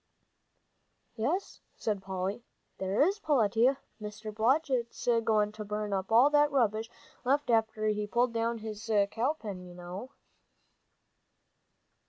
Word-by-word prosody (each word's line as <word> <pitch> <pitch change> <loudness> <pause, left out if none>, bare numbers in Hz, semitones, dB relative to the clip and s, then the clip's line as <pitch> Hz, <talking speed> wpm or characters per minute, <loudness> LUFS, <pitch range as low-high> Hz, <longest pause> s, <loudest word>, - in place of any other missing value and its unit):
"Yes," 305 - -2 0.2
said 210 -3 -2
Polly, 190 +4 -3 0.4
"there 190 +7 +2
is, 400 +2 -1
Peletiah. 255 - +3 0.2
Mr. 210 +1 -7
Blodgett's 245 +2 0 0.2
goin' 215 -2 +2
to 215 0 -7
burn 210 0 -3
up 190 +1 -2
all 245 +6 +6
that 295 0 +5
rubbish 225 -4 +1 0.3
left 275 +1 +1
after 220 -1 +1
he 210 -1 0
pulled 240 +3 +1
down 230 0 0
his 220 0 -7 0.2
cow 250 +6 +1
pen, 205 -11 -7
you 180 -1 -11
know." 180 +7 -7
220 Hz, 125 wpm, -30 LUFS, 210-250 Hz, 0.4 s, all